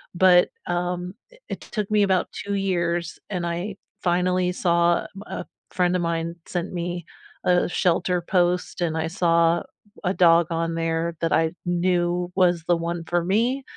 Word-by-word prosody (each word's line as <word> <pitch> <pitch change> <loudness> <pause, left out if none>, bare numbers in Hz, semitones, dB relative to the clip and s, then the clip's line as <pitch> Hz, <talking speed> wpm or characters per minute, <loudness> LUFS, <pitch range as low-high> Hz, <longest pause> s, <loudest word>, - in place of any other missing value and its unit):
But, 180 0 +6 0.2
um, 180 +1 -2 0.2
i - - -18
it - - -4
took 210 -2 -4
me 210 -1 +4
about 190 -2 +1
2 200 - -4
years, 175 -3 -1
and 180 -4 -2
I 175 +4 -3 0.3
finally 180 0 +1
saw 170 -1 +2
a - - -10 0.2
a - - -6 0.3
friend 180 -1 +2
of 180 - +1
mine 170 0 -2
sent 175 0 -3
me 175 0 -3 0.4
a 180 0 +3
shelter 180 0 +1
post, 180 0 0
and 160 -2 0
I 160 0 -1
saw 170 -1 +3
w - - -7 0.4
a 180 - +2
dog 170 -2 +5
on 165 0 0
there 165 0 0 0.2
that 165 -1 +1
I 160 +2 +4 0.2
knew 175 0 +1 0.3
was 180 -2 +4
the 175 - +3
one 170 0 -4
for 175 0 +2
me. 250 +6 +1
175 Hz, 170 wpm, -24 LUFS, 170-180 Hz, 0.4 s, But